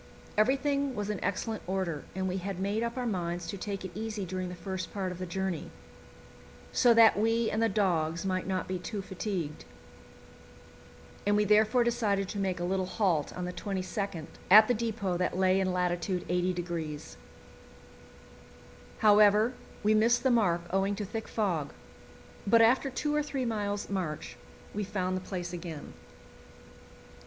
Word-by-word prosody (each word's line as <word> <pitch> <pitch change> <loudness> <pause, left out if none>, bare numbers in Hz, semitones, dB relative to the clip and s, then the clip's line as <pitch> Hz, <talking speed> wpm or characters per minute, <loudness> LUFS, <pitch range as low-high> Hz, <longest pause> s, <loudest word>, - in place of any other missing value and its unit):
Everything 275 +4 +2
was 210 0 -2
in 205 - -4
excellent 210 +3 -2
order, 180 -6 -2
and 190 0 -1
we 185 +1 -1
had 190 0 -4
made 200 +3 0
up 235 +1 -2
our 250 - -1
minds 175 -5 -2
to 165 - -4
take 195 0 -5
it 185 - -6
easy 215 0 -4
during 185 0 -4
the 180 - -6
first 185 0 -5
part 190 -2 -3
of 180 - -8
the 185 - -4
journey, 185 -2 -3 1.0
so 245 - +5
that 230 -1 +7
we 225 +1 +2
and 220 - 0
the 225 - +3
dogs 170 -4 0
might 185 -1 -1
not 190 -1 -1
be 185 -1 -3
too 200 +2 -5
fatigued, 185 -5 -4 1.6
and 205 0 +2
we 210 0 +3
therefore 215 +4 +4
decided 215 -5 +1
to 200 - -4
make 190 -2 -1
a - - -2
little 185 +1 0
halt 180 -8 +1
on 180 - -3
the 180 - -4
22nd 190 -3 -3 0.2
at 215 +3 +9
the 245 - +3
depot 220 -5 -1
that 180 0 -1
lay 190 0 +3
in 190 -1 +1
lat. 180 -1 +1
80°. 175 -3 -2 1.8
However, 210 +2 +5 0.3
we 210 +1 +4
missed 230 +3 +3
the 260 - +4
mark 185 -8 +3
owing 195 +2 +1
to 210 0 -4
thick 220 +2 -5
fog, 175 -10 -1 0.7
but 230 +3 +6
after 255 +4 +4
two 295 +3 -2
or 300 - +3
three 275 -3 -3
miles' 205 -3 -2
march 180 -7 -3 0.4
we 210 - -2
found 185 -2 -2
the 185 - -3
place 180 -2 -5
again. 170 -4 -7
195 Hz, 165 wpm, -30 LUFS, 180-215 Hz, 1.8 s, at